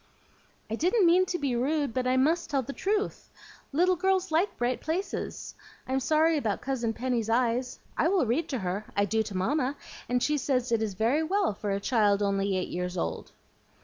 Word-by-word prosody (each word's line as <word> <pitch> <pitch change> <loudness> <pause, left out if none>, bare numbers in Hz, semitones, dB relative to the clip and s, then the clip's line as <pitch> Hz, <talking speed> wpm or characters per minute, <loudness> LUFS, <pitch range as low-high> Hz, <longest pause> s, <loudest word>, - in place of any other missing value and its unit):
"I 220 - -5
didn't 365 - +2
mean 360 +2 +5
to 355 - -1
be 280 -6 -1
rude, 280 +1 0
but 255 +1 -1
I 255 +1 +2
MUST 310 +6 +2
tell 275 -3 0
the 275 - -6
truth. 410 +5 -2 0.4
Little 360 +6 +3
girls 380 0 +1
like 340 +6 +1
bright 245 +1 -1
places. 345 +6 -3 0.3
I'm 265 +1 +1
sorry 315 +4 +3
about 220 -8 -1
Cousin 250 -4 -1
Penny's 235 -1 -2
eyes. 245 +2 +1 0.2
I - - +2
will 365 -5 +2
read 260 +8 0
to 265 - -1
her; 190 +1 -3
I 200 - +4
do 220 +3 +1
to 205 -3 -4
Mamma, 270 +7 0 0.3
and 245 0 +1
she 300 0 +1
says 255 -3 0
it 230 -1 +2
is 210 -3 -2
very 235 +9 +2
well 380 - +1
for 205 +1 -5
a 195 0 0
child 205 -2 +2
only 195 -1 +1
eight 185 - -2
years 180 +1 -3
old." 80 -1 -3
255 Hz, 200 wpm, -28 LUFS, 220-320 Hz, 0.4 s, mean